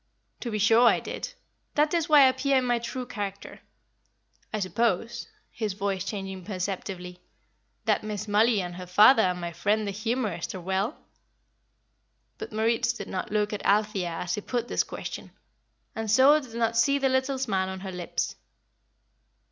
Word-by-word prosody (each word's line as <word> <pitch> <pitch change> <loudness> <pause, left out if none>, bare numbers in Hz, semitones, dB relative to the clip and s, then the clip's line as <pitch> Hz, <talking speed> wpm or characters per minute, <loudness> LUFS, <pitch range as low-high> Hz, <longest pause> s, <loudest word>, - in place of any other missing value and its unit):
"To 240 - -4
be 215 - -2
sure 225 +4 +5
I - - +4
did. - - -6 0.4
That 300 +1 +2
is 335 -3 0
why 300 -2 +8
I 265 - +8
appear 265 +1 +1
in 255 - +1
my 240 -1 +1
true 245 +2 -5
character. 205 -5 -6 0.9
I 215 - -2
suppose" 230 +3 -1 0.2
his 215 -4 -3
voice 195 -1 -2
changing 195 -2 -5
perceptibly 185 -2 -5 0.7
"that - - +2
Miss 215 0 -4
Mollie 210 +1 +3
and 175 0 -6
her 180 0 -8
father 215 +6 +7
and 180 -2 +1
my 170 -1 -4
friend 215 +4 0
the 200 - -2
humourist 215 -4 -2
are - - -5
well?" 190 +5 -1 1.4
But - - -6
Moritz 225 +2 +1
did 205 -5 -8
not 185 - -4
look 210 0 0
at 205 - -4
Althea 205 -3 +1
as 170 +1 -3
he 210 - -2
put 240 +2 -2
this - - +1
question, - - -7 0.6
and 225 -1 -3
so 265 +7 +6
did 250 -6 -11
not 230 -1 0
see 280 +5 +3
the 275 -1 +1
little 260 +1 +1
smile 195 -8 -1
on 190 0 -6
her 190 -1 -5
lips. 180 -1 -3
215 Hz, 170 wpm, -27 LUFS, 190-240 Hz, 1.4 s, why